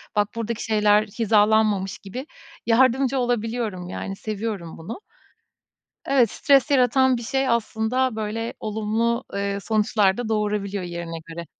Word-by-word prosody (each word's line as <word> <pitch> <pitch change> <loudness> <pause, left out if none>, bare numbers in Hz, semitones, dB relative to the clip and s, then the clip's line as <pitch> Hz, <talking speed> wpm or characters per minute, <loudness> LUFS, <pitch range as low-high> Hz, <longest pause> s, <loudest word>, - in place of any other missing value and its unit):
bak, 205 -1 +3
buradaki 230 0 -3
şeyler 210 -1 +3
hizalanmamış 210 -2 +2
gibi 245 +7 -7 0.4
yardımcı 260 +3 +3
olabiliyorum. 225 -6 -2
Yani, 195 +1 -5
seviyorum 205 -5 -5
bunu. 175 - -7 1.1
Evet, 255 -6 +3
stres 280 +1 +3
yaratan 260 -1 +4
bir 235 - -6
şey, 265 +3 0
aslında, 235 +2 0
böyle 220 +2 -3
olumlu, 220 +3 -1
eee, 200 0 -1
sonuçlar 210 -2 +2
da 240 -2 -3
doğurabiliyor 205 -2 -1
yerine 170 -1 -5
göre. 170 +1 -7
220 Hz, 125 wpm, -23 LUFS, 200-235 Hz, 1.1 s, yaratan